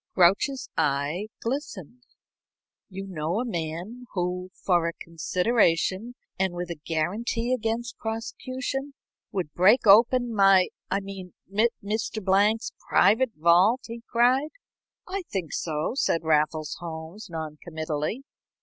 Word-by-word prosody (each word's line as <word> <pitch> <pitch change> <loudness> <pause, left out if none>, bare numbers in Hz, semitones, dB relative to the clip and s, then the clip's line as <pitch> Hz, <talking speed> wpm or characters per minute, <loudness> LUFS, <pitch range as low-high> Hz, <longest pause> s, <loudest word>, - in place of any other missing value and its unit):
Grouch's 200 +10 +3
eye 150 +6 0 0.2
glistened. 245 - -4 0.9
"You 195 0 -6
know 175 +1 -2
a 250 - -1
man 175 +5 -5
who, 180 0 -2
for 175 -3 +1
a 170 - -2
consideration 185 +5 0 0.2
and 190 -2 0
with 175 0 -4
a 160 -3 -7
guarantee 225 +9 -1
against 235 0 -2
prosecution, 255 +5 -4 0.4
would 180 -7 -3
break 205 +9 +5
open 235 +4 +6
my 195 -3 +5 0.2
I 195 +2 0
mean 195 -2 -9 0.5
Mr. 215 +2 -2
Blank's 205 +3 +2 0.2
private 225 +5 +4
vault?" 175 - +4
he 230 0 -7
cried. 255 +5 +3 0.6
"I 390 +2 -3
think 180 -6 -3
so," 155 -2 -1
said 170 -10 +1
Raffles 155 0 +1
Holmes, 170 +4 -8
noncommittally. 160 - -4
195 Hz, 115 wpm, -26 LUFS, 170-230 Hz, 0.9 s, open